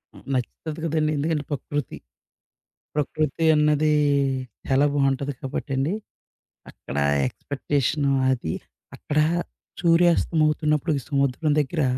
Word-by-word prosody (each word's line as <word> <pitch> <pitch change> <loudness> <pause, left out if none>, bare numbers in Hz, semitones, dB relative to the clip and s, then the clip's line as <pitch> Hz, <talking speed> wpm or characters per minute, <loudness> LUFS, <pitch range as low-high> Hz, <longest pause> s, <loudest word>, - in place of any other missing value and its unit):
హ్మ్. - - -14
నచ్చుతది 150 +5 -3
గదండి! 155 -1 +1
ఎందుకంటే 150 +1 0
ప‌కృతి. 145 -1 -3 1.0
ప్రకృతి 150 +1 -1
అన్నది 150 0 +3 0.8
చాలా 135 +2 +3
బావుంటది 140 0 +1
కాబట్టండి. 135 +3 -2 0.8
అక్కడ 70 - -8 0.3
ఎక్స్‌పె‌క్టేషను 140 - -1 0.2
అది, 120 -11 -2 0.4
అక్కడ 150 0 -1 0.6
సూర్యాస్తమవుతున్నప్పుడు 165 -2 +3 0.2
సముద్రం 140 +1 +1
దెగ్గర 150 +2 0
150 Hz, 85 wpm, -24 LUFS, 140-155 Hz, 1.0 s, అన్నది